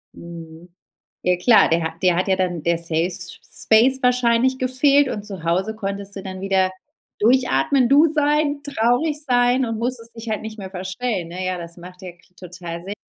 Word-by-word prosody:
Mhm. 170 0 -11 0.5
Ja 180 0 +2
klar, 220 +5 +5
dir 165 +1 +1
ha 160 0 -3
dir 180 -2 +3
hat 185 +2 -1
ja 190 - +2
dann 175 -4 -2
der 170 0 +1
Safe 165 -1 -1
S 180 -2 -4 0.3
Space 260 +5 +4
wahrscheinlich 250 +1 +2
gefehlt 275 +2 +3
und 205 -1 -4
zu 195 -6 -7
Hause 185 +6 -1
konntest 200 -1 -5
du 195 - -7
dann 185 -1 -7
wieder 190 -1 +1 0.5
durchatmen, 245 - +2
du 290 +4 +6
sein, 295 -1 +1
traurig 285 +3 0
sein 245 +1 +2
und 225 -1 -4
musstest 235 -1 -5
dich 225 0 -8
halt 215 - -2
nicht 220 0 -8
mehr 190 - -7
verstellen, 190 0 -4
ne? 185 +2 -5
Ja, 185 -1 -2
das 170 0 -9
macht 180 +2 -13
ja 185 - -8
k 175 - -27 0.2
total 175 -1 -8
Sinn. 195 +2 -6
200 Hz, 195 wpm, -21 LUFS, 180-250 Hz, 0.5 s, du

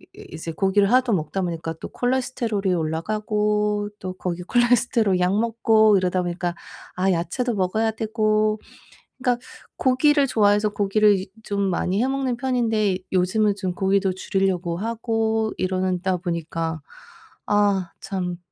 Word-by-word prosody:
이 - - -15
이제 165 +1 -6
고기를 195 +4 +2
하도 255 -2 +3
먹다 170 +3 -2
보니까 165 -2 -3
또 - - -6
콜레스테롤이 245 -6 -1
올라가고 210 +5 -1
또 185 -1 -4
거기에 180 -1 -4
콜레스테롤 240 -5 +2
약 180 +2 +2
먹고 220 -2 +4
이러다 185 0 0
보니까 175 0 -3 0.4
아 190 +1 +2
야채도 195 +9 -1
먹어야 215 +4 0
되고 215 -1 0 0.6
그러니까 250 -2 -1 0.3
고기를 275 +2 +3
좋아해서 210 -2 +3
고기를 205 +1 +3
이제 190 0 -5
좀 200 -1 -2
많이 185 +4 0
해 - - +1
먹는 265 -2 -1
편인데 225 -6 0
요즘은 200 +3 +2
좀 185 -2 -2
고기도 195 0 +1
줄이려고 185 -2 -1
하고 225 0 -1
이러는 185 -1 -1
다 190 0 0
보니까 165 -1 -3 0.7
아 200 -4 +2
참 185 -3 -3
205 Hz, 320 characters per minute, -23 LUFS, 185-225 Hz, 0.7 s, 먹고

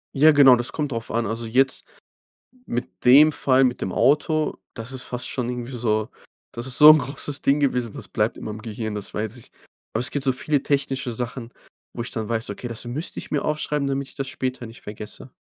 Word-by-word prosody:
Ja, 155 +3 +7
genau, 135 -3 +8
das 120 +1 -3
kommt 145 -3 -3
drauf 115 -1 -4
an. 115 0 0
Also 115 +2 -3
jetzt 130 +4 +1 0.8
mit 120 +2 -5
dem 145 +5 +8
Fall, 135 -1 +3
mit 125 -1 0
dem 95 - -3
Auto, 155 +2 +2 0.2
das 115 +3 -7
ist 130 -1 -4
fast 125 +2 -5
schon 125 -2 -3
irgendwie 125 +1 -5
so 110 -2 0 0.4
das 120 +2 -6
ist 130 - -3
so 150 0 +10
'n 155 - +8
großes 140 +1 -3
Ding 140 +2 +3
gewesen, 125 -5 0
das - - -9
bleibt - - -1
in - - -8
meinem 110 +1 -6
Gehirn, 110 -1 -5
das 105 - -7
weiß 110 +3 -3
ich. 120 - -15 0.4
Aber - - -1
es 125 - +2
gibt 145 -1 -2
so 130 - +3
viele 145 +2 0
technische 135 -3 -1
Sachen, 120 0 -5 0.4
wo - - -7
ich 120 - -6
dann 110 -2 -4
weiß: 115 -1 -2
„Okay, 120 +4 -6
das 115 +1 -7
müsste 145 +8 -4
ich - - -8
mir 145 - -1
aufschreiben, 150 -2 -1
damit 135 0 -2
ich - - -16
das 135 -1 -4
später 130 -2 -4
nicht 115 - -12
vergesse“. 105 0 -9
125 Hz, 225 wpm, -23 LUFS, 115-140 Hz, 0.8 s, so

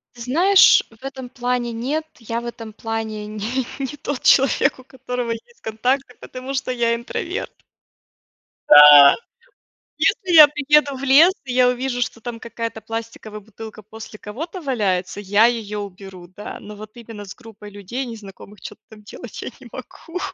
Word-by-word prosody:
Ты 235 - -9
знаешь, 360 +10 +5
в 225 +3 -21
этом 265 -2 -7
плане 245 -1 -3
нет, 275 +8 -3
я 230 0 -4
в 240 - -9
этом 225 -2 -8
плане 220 -1 -5
не 220 +5 -4
не 275 +1 -5
тот 285 -1 -5
человек, 270 +1 +3
у 255 - -15
которого 250 -2 -5
есть 470 - -10
контакты, 250 +4 -2
потому 255 +2 -8
что 265 -1 -3
я 235 -1 0
интроверт. 235 +1 -5 1.2
Да! 145 -1 +9 0.8
Если 375 -6 0
я 305 -2 +11
приеду 295 -1 +2
в 260 - -9
лес 290 +7 +6
и 255 - -5
я 250 0 +4
увижу, 250 0 -2
что 235 -1 -3
там 235 -2 -7
какая-то 230 -1 -6
пластиковая 225 -1 -7
бутылка 215 +1 -12
после 215 +1 -12
кого-то 320 - -8
валяется, 205 -8 -2
я 205 +2 +3
ее 220 -3 -3
уберу, 190 -2 -9
да. 195 +3 -9
Но 210 +1 -11
вот 215 +1 -11
именно 225 -3 -10
с 190 - -10
группой 220 -4 -14
людей 205 +7 -6
незнакомых, 210 -2 -12
чё-то 210 - -10
там 215 -1 -15
делать 210 - -10
я - - -5
не - - -13
могу. 350 +2 -9
235 Hz, 165 wpm, -20 LUFS, 215-260 Hz, 1.2 s, я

